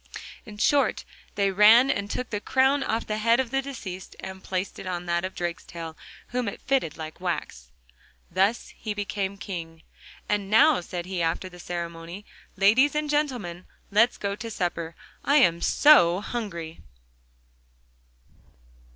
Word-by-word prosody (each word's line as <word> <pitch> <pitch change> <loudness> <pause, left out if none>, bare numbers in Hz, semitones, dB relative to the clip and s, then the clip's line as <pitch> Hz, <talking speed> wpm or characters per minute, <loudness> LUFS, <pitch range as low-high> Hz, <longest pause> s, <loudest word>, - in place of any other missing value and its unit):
In 210 -1 -10
short, 280 +6 +2 0.3
they 200 -1 +2
ran 220 +7 +7
and 200 0 -3
took 250 +3 -4
the 210 -2 -2
crown 265 +4 +3
off 230 -4 -1
the 215 0 -2
head 230 +2 +3
of 255 -3 -1
the 270 0 +1
deceased, 210 -10 -8
and 190 0 -8
placed 185 0 -3
it - - -7
on 180 -1 -3
that 170 0 0
of 185 - -4
Drakestail, 170 -1 -5 0.3
whom 245 -2 -2
it 200 - -5
fitted 260 - 0
like 160 +1 -8
wax. 150 - -4 0.6
Thus 195 +6 +1
he 215 -2 -5
became 200 -1 -3
King. 165 -5 -7 0.4
'And 205 -2 -1
now,' 275 +4 +5
said 175 0 -6
he 185 -1 -3
after 165 +3 -1
the 180 -1 -14
ceremony, 170 +2 -6 0.3
'ladies 225 +10 +4
and 300 -1 -1
gentlemen, 245 - -2 0.2
let's 230 +4 +4
go 200 0 -2
to 230 +2 -7
supper. 170 -5 -3 0.3
I 285 - +2
am 170 - +4
so 185 - +6
hungry! 185 -8 -5
200 Hz, 150 wpm, -26 LUFS, 175-235 Hz, 0.6 s, ran